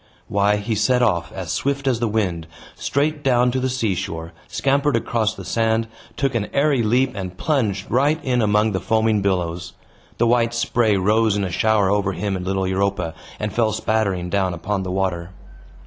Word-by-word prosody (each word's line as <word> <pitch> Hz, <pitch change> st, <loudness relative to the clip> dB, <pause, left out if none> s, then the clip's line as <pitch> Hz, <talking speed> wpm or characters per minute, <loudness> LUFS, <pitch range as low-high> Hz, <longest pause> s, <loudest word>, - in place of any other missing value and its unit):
Why, 100 Hz, +1 st, +2 dB
he 105 Hz, +2 st, -2 dB
set 125 Hz, +4 st, +2 dB
off, 85 Hz, -8 st, +1 dB
as -, -, -5 dB
swift 140 Hz, 0 st, -1 dB
as 125 Hz, -4 st, +2 dB
the 120 Hz, -, 0 dB
wind, 95 Hz, -7 st, -1 dB, 0.3 s
straight 145 Hz, +1 st, -1 dB
down 125 Hz, -2 st, +3 dB
to 130 Hz, -, -1 dB
the 130 Hz, 0 st, 0 dB
seashore, 95 Hz, -9 st, -3 dB
scampered 140 Hz, +1 st, +1 dB
across 115 Hz, -1 st, 0 dB
the -, -, -9 dB
sand, 115 Hz, 0 st, +1 dB, 0.3 s
took 135 Hz, -2 st, 0 dB
an 110 Hz, -3 st, -1 dB
airy 140 Hz, -2 st, +2 dB
leap, 125 Hz, +4 st, +2 dB
and 95 Hz, -2 st, -6 dB
plunged 110 Hz, -10 st, 0 dB
right 145 Hz, +6 st, +2 dB
in 125 Hz, -2 st, +1 dB
among 105 Hz, 0 st, +2 dB
the 95 Hz, -, -1 dB
foaming 110 Hz, -1 st, +1 dB
billows. 90 Hz, -2 st, -2 dB, 0.4 s
The 120 Hz, -, +2 dB
white 120 Hz, 0 st, +2 dB
spray 115 Hz, -3 st, +2 dB
rose 105 Hz, +2 st, +2 dB
in 100 Hz, -, 0 dB
a 95 Hz, -, -3 dB
shower 105 Hz, +1 st, +2 dB
over 100 Hz, -1 st, +1 dB
him 100 Hz, +1 st, -2 dB
and 90 Hz, -, -4 dB
little 95 Hz, 0 st, 0 dB
Europa, 95 Hz, -3 st, -1 dB, 0.3 s
and 105 Hz, -2 st, -3 dB
fell 110 Hz, -2 st, +1 dB
spattering 100 Hz, -5 st, -1 dB
down 95 Hz, -3 st, 0 dB
upon 95 Hz, +4 st, -2 dB
the 95 Hz, -, -4 dB
water. 90 Hz, -2 st, -2 dB
105 Hz, 185 wpm, -21 LUFS, 95-120 Hz, 0.4 s, down